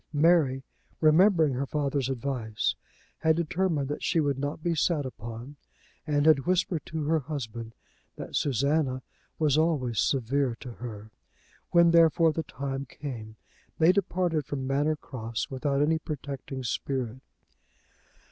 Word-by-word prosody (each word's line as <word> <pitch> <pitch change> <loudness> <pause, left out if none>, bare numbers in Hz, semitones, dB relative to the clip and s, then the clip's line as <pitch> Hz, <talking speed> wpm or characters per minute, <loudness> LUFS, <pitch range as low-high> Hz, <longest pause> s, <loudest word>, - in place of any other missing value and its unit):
Mary, 145 -4 +3 0.4
remembering 160 -1 +5
her 135 +2 -2
father's 140 -3 -1
advice, 125 -4 -1 0.5
had 160 -1 +3
determined 170 -3 0
that 145 - -4
she 165 - +1
would 140 -3 0
not 145 +3 -3
be 170 - +1
sat 155 -2 +1
upon, 115 +3 -8 0.5
and 145 -1 +2
had 155 -1 +4
whispered 180 -3 +1
to 160 -1 -3
her 160 +2 +2
husband 120 -6 -6 0.4
that - - -7
Susanna 140 0 +1 0.3
was 155 -2 +3
always 135 - +1
severe 130 0 +1
to 125 - -8
her. 110 -3 -8 0.6
When, 170 -1 +5
therefore, 165 -1 +5
the 165 - -1
time 135 -2 -5
came, 120 -7 -7 0.4
they 165 +2 +6
departed 180 -5 0
from 135 -2 -3
Manor 145 +3 +1
Cross 115 -6 -5
without 140 +1 0
any 160 +2 +2
protecting 140 -3 -6
spirit. 125 0 -2
145 Hz, 135 wpm, -28 LUFS, 130-160 Hz, 0.6 s, they